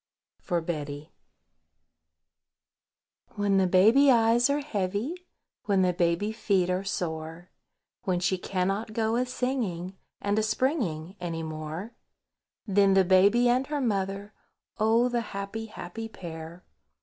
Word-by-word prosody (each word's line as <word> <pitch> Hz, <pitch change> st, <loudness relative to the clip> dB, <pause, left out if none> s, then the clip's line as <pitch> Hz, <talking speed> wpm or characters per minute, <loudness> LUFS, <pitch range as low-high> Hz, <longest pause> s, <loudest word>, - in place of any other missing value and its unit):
FOR 175 Hz, -3 st, -1 dB
BETTY. 150 Hz, -, -5 dB, 2.2 s
WHEN 200 Hz, -1 st, +2 dB
the 190 Hz, -1 st, +3 dB
baby 220 Hz, +10 st, +5 dB
eyes 235 Hz, +1 st, +4 dB
are 285 Hz, +1 st, +1 dB
heavy, 205 Hz, -, -2 dB, 0.5 s
When 195 Hz, -2 st, +3 dB
the 180 Hz, -1 st, +2 dB
baby 175 Hz, +4 st, +1 dB
feet 195 Hz, -5 st, +1 dB
are 185 Hz, +1 st, -1 dB
sore, 165 Hz, -2 st, -4 dB, 0.5 s
When 180 Hz, -2 st, 0 dB
she 185 Hz, +1 st, 0 dB
cannot 195 Hz, +4 st, -2 dB
go 225 Hz, 0 st, 0 dB
a 250 Hz, +1 st, 0 dB
singing 220 Hz, -9 st, -2 dB, 0.2 s
And 205 Hz, +1 st, 0 dB
a -, -, +2 dB
springing 215 Hz, -, -1 dB
any 165 Hz, -2 st, -4 dB
more, 155 Hz, +7 st, -6 dB, 0.7 s
Then 200 Hz, -2 st, +3 dB
the 190 Hz, -1 st, +5 dB
Baby 200 Hz, +6 st, +5 dB
and 255 Hz, +2 st, +2 dB
her 295 Hz, -1 st, -2 dB
mother, 200 Hz, -3 st, -2 dB, 0.5 s
Oh! 225 Hz, +3 st, +3 dB
the 240 Hz, -1 st, 0 dB
happy, 210 Hz, +1 st, -5 dB
happy 225 Hz, +2 st, -7 dB
pair! 165 Hz, -2 st, -9 dB
195 Hz, 125 wpm, -27 LUFS, 175-225 Hz, 2.2 s, baby